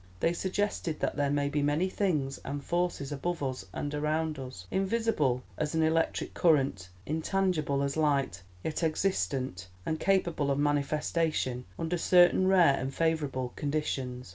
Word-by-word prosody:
They 165 - +2
suggested 190 -3 -2
that - - 0
there 145 -1 +1
may 145 0 +1
be 145 +1 0
many 145 +5 +2
things 155 -9 -1
and 140 0 -4
forces 175 -5 -1
above 150 +3 -2
us 130 -7 -3
and 145 +8 -4
around 155 0 -1
us, 125 -9 -8
invisible 190 - +1 0.2
as 155 +1 -1
an 160 - +3
electric 160 +1 +1
current, 135 - +2 0.2
intangible 160 -3 0
as 140 0 -1
light, 140 - +1 0.2
yet 160 - -2
existent 140 - -1 0.2
and 160 -1 -1
capable 175 -7 +1
of 140 - +1
manifestation 145 -2 0
under 165 +1 -2
certain 180 +2 +5
rare 175 -8 +5
and 135 +1 -3
favourable 145 -5 0
conditions. 135 -5 -3
150 Hz, 145 wpm, -30 LUFS, 140-170 Hz, 0.2 s, certain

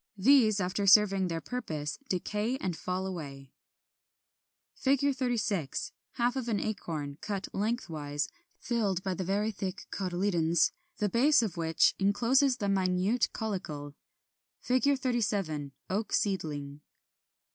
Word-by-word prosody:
These, 215 -1 +5
after 195 +2 -1
serving 195 -2 +6
their 165 -1 -3
purpose, 160 -13 -4
decay 210 +7 -1
and 185 -9 -3
fall 185 +3 -3
away. 140 -7 -7 1.3
[Illustration: 280 +1 +3
Fig. - - -4
36. 220 - -1 0.2
Half 240 +1 +1
of 260 -3 -3
an 215 -4 0
acorn, 155 -9 -4
cut 200 -2 -3
lengthwise, 160 - -2 0.3
filled 205 -6 -1
by 190 - -1
the 185 - -3
very 205 +4 0
thick 190 -2 -5
cotyledons, 175 -3 +1 0.3
the 210 - +1
base 250 +6 +4
of 205 -7 -3
which 165 -1 +3
encloses 245 +7 +3
the 200 - -2
minute 195 +4 +2
caulicle. 160 -10 -4 0.7
37. 235 - 0 0.2
Oak 205 +3 -2
seedling. 150 -7 -1
195 Hz, 120 wpm, -30 LUFS, 170-230 Hz, 1.3 s, serving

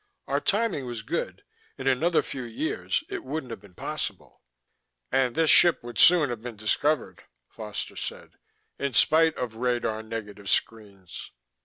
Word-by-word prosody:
"Our - - +1
timing 200 - 0
was 120 -3 -5
good; - - -3 0.3
in 135 - -7
another 155 +6 +2
few 135 - -6
years, 310 - -2
it 395 -3 -5
wouldn't 155 - -5
have 115 - -7
been 100 -4 -18
possible." - - -5 0.7
"And 130 -2 +2
this 165 -1 +4
ship 175 -7 +6
would 120 -2 -5
soon 165 -7 +7
have 115 -2 -5
been 120 -1 -7
discovered," 145 +8 0 0.3
Foster 105 - -7
said. - - -7 0.4
"In 140 -3 -2
spite 160 +4 +4
of 115 -3 -4
radar 120 -3 -1
negative 105 -3 -7
screens." 100 -5 -3
125 Hz, 150 wpm, -26 LUFS, 110-155 Hz, 0.7 s, soon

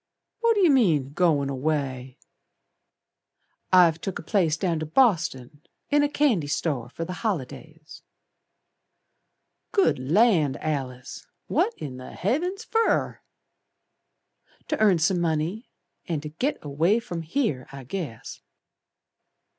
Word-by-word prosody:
What 460 -1 +2
yer 360 -6 +5
mean 160 - +2
goin' 150 -5 +2
away?" 135 -2 -3 1.5
"I've 170 -3 +5
took 195 - -4
a - - -8
place 170 -5 +1
Down 170 -3 -1
to 155 - -4
Boston, 155 - +1 0.3
in 290 0 +4
a 290 - +2
candy 255 - +1
store 145 -5 -2
For 165 +6 -5
the 180 - -5
holidays." 160 - -5 1.7
"Good 395 - +2
Land, 160 - +3
Alice, 130 -5 -5 0.2
What 445 +6 0
in 130 -4 -7
the 130 - -10
Heavens 355 - -1
fer!" 455 0 0 1.5
"To - - -1
earn 205 -5 +5
some 175 +2 +1
money, 165 +7 -2 0.4
And 155 -4 -2
to 150 - -5
git 250 - -2
away 160 +8 +2
from 175 -7 -6
here, 165 - -2
I 135 -1 -9
guess." 135 - -6
165 Hz, 120 wpm, -25 LUFS, 145-220 Hz, 1.7 s, yer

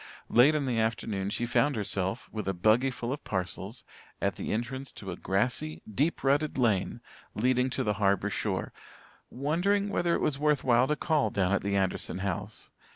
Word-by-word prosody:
Late 135 +6 +6
in 145 -2 0
the 120 -3 0
afternoon 110 -3 -1
she 120 - -1
found 140 +4 +2
herself, 100 +1 -1
with 105 -3 -5
a 95 - 0
buggy 110 +9 +3
full 125 0 -3
of 145 - -7
parcels, 95 +5 -3 0.4
at - - 0
the - - -4
entrance 130 +4 -3
to 95 -2 -7
a - - -4
grassy, 95 -6 -1
deep 140 +10 0
rutted 145 +2 +2
lane 110 -7 +1 0.3
leading 125 +3 +2
to 130 - -1
the 105 - +1
harbour 100 0 +2
shore, - - -2 0.6
wondering 180 +9 0
whether 175 -4 +1
it - - -1
was 140 -2 0
worth 150 -1 +2
while 125 0 +4
to 150 - +1
call 155 -2 +1
down 95 -2 0
at 100 - +2
the 100 0 -1
Anderson 95 -1 -1
house. 95 -2 -4
120 Hz, 185 wpm, -29 LUFS, 100-140 Hz, 0.6 s, Late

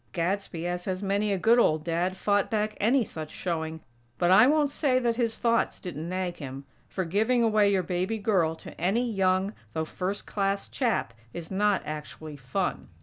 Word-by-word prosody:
Gadsby, 175 -1 -2
as 175 0 -3
has 185 0 -3
many 200 +1 +1
a 195 - +1
good 230 +6 +4
old 155 -8 +3
Dad, 175 +3 -1
fought 205 0 +1
back 215 -1 -1
any 240 +5 +3
such 160 -6 -7
showing; 160 -2 -4 0.4
but 175 0 +2
I 215 +6 +8
won't 295 -1 +3
say 275 -3 +1
that 240 -2 +1
his 230 -2 0
thoughts 230 -1 +1
didn't 170 -3 -6
nag 185 -1 -2
him; 135 -1 -7 0.2
for, 185 - -2
giving 220 +8 +2
away 215 -2 +4
your 190 -2 +2
baby 185 +5 -1
girl 185 -7 +1
to - - -11
any 220 +8 +1
young, 190 -1 +1 0.2
though 160 0 -1
first 190 +5 -4
class 195 -1 -1
chap, 235 - -1 0.2
is 170 0 -7
not 205 0 +2
actually 155 0 -7
fun. 125 -3 -3
190 Hz, 185 wpm, -27 LUFS, 170-215 Hz, 0.4 s, I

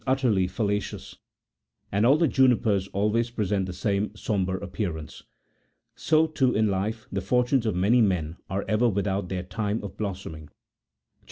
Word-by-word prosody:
381 130 0 +2 0.2
utterly 95 -2 +2
fallacious, 105 +1 -3 0.7
and 105 +4 +3
all 140 +4 +6
the 165 0 +3
junipers 115 -8 +3
always 105 +4 0
present 100 -4 -1
the - - -4
same 100 +2 -1
sombre 95 -4 -1
appearance. 90 -6 -5 0.7
So, 155 +1 +2
too, 140 -5 +1
in 110 0 +2
life, 105 +4 -2
the 95 - -2
fortunes 125 +4 +1
of 105 - 0
many 105 +7 +3
men 90 -6 0
are 95 +2 -2
ever 110 +4 +3
without 100 -2 -1
their 90 -2 -3
time 105 +3 -3
of 100 - -8
blossoming. 95 -7 -5
CHAP. 75 - -30
100 Hz, 160 wpm, -26 LUFS, 95-115 Hz, 0.7 s, all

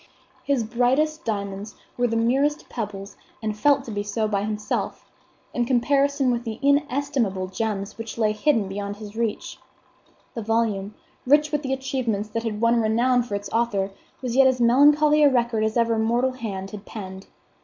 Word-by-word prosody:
His 275 -4 +1
brightest 260 +8 +1
diamonds 200 -1 -4 0.2
were 245 0 +1
the 230 - -2
merest 270 +6 +1
pebbles, 205 -4 -6 0.2
and 215 -1 -3
felt 280 +5 +3
to 235 - -8
be 205 -1 -2
so 205 +2 -1
by 200 -2 -1
himself, 210 0 -3 0.5
in 245 - +1
comparison 275 +2 +2
with 235 0 -1
the 225 -2 -5
inestimable 280 -8 +1
gems 205 +1 -3
which 225 0 -6
lay 215 -2 +2
hidden 215 -1 +1
beyond 200 +1 -4
his 210 0 -10
reach. 230 -2 -3 0.7
The 230 - -4
volume, 215 -2 -1 0.3
rich 300 +2 +4
with 295 0 -1
achievements 260 -6 -2
that 230 +2 -2
had 220 -2 -4
won 235 0 +3
renown 240 +3 +2
for 235 -4 -4
its 200 0 -5
author, 215 -4 0 0.3
was 245 -2 -2
yet 270 0 +6
as 260 -1 +1
melancholy 295 +5 +5
a 290 - +7
record 240 -4 +1
as 220 +2 0
ever 230 -1 +2
mortal 240 +4 +1
hand 200 -6 -6
had 205 -1 -8
penned. 190 -3 -8
230 Hz, 170 wpm, -24 LUFS, 210-260 Hz, 0.7 s, a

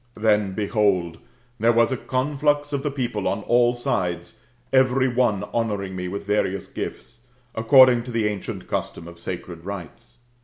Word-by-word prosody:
Then, 105 -3 +2
behold, 100 -5 0 0.4
there 115 +2 +4
was 115 +2 +3
a - - +1
conflux 145 +3 0
of 140 - 0
the 145 - -1
people 120 -7 -2
on 105 +1 -1
all 120 +1 +3
sides, 95 -3 -3 0.3
every 130 0 +4
one 120 -6 +1
honouring 100 -5 -2
roe 90 -1 -4
with 100 +2 -5
various 100 -2 -1
gifts, 115 +2 -8 0.3
according 120 +1 +6
to 125 - -7
the 115 -2 0
ancient 105 -2 -4
custom 85 - -4
of 85 0 -12
sacred 85 -1 -7
rites. 95 -4 -9
110 Hz, 155 wpm, -23 LUFS, 95-125 Hz, 0.4 s, according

